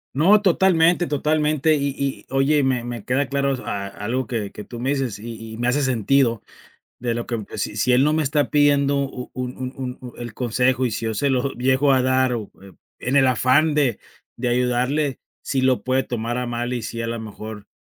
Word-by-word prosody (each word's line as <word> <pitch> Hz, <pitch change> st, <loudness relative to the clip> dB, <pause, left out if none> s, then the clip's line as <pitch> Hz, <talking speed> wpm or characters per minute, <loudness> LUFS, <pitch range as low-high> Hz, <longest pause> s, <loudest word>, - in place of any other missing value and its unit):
No, 190 Hz, +9 st, +5 dB
totalmente, 175 Hz, -2 st, +3 dB
totalmente 150 Hz, +1 st, +1 dB
y 140 Hz, -1 st, 0 dB
y 140 Hz, -1 st, -3 dB
oye, 140 Hz, +2 st, +3 dB
me 130 Hz, -2 st, +1 dB
me 120 Hz, -3 st, -6 dB
queda 135 Hz, +2 st, +1 dB
claro 140 Hz, 0 st, +1 dB
a 100 Hz, -1 st, -3 dB
algo 115 Hz, +6 st, -3 dB
que 110 Hz, -4 st, -3 dB
que 105 Hz, -, -9 dB
tú 120 Hz, -, -9 dB
me 130 Hz, -, -1 dB
dices 135 Hz, -7 st, -1 dB
y 115 Hz, 0 st, -8 dB
y -, -, -8 dB
me 120 Hz, +1 st, 0 dB
hace 145 Hz, +4 st, +1 dB
sentido 125 Hz, -2 st, +2 dB, 0.6 s
de 120 Hz, -1 st, -1 dB
lo 120 Hz, 0 st, -4 dB
que 115 Hz, -3 st, -3 dB
si -, -, -3 dB
si 120 Hz, +4 st, +2 dB
él 125 Hz, +1 st, +5 dB
no 150 Hz, +2 st, +3 dB
me 155 Hz, 0 st, +1 dB
está 145 Hz, 0 st, +1 dB
pidiendo 145 Hz, -1 st, +3 dB
u 135 Hz, -2 st, -4 dB
un 125 Hz, 0 st, -4 dB, 0.2 s
un 130 Hz, -1 st, -5 dB
un 125 Hz, -2 st, -9 dB
el 120 Hz, -3 st, -7 dB
consejo 125 Hz, +2 st, +1 dB
y 125 Hz, -, +1 dB
si, 115 Hz, -, -4 dB
yo 110 Hz, -1 st, -1 dB
se 140 Hz, +7 st, +1 dB
lo 130 Hz, +1 st, 0 dB
llego 130 Hz, +3 st, +2 dB
a 130 Hz, -1 st, +3 dB
dar, 130 Hz, 0 st, +2 dB
o 110 Hz, -4 st, -4 dB, 0.5 s
en 130 Hz, -, -2 dB
el 135 Hz, -2 st, +5 dB
afán 130 Hz, +5 st, +3 dB
de 135 Hz, -7 st, +1 dB, 0.4 s
de 125 Hz, +1 st, -2 dB
ayudarle, 125 Hz, +4 st, 0 dB, 0.2 s
sí 135 Hz, -, 0 dB
lo 130 Hz, -1 st, +2 dB
puede 130 Hz, +1 st, +2 dB
tomar 120 Hz, -1 st, -3 dB
a 125 Hz, -, -2 dB
mal 120 Hz, +1 st, -3 dB
y 120 Hz, -2 st, -2 dB
sí, 115 Hz, -, -5 dB
a 115 Hz, -, -2 dB
lo 115 Hz, 0 st, -3 dB
mejor, 110 Hz, -1 st, -8 dB
130 Hz, 215 wpm, -22 LUFS, 120-140 Hz, 0.6 s, No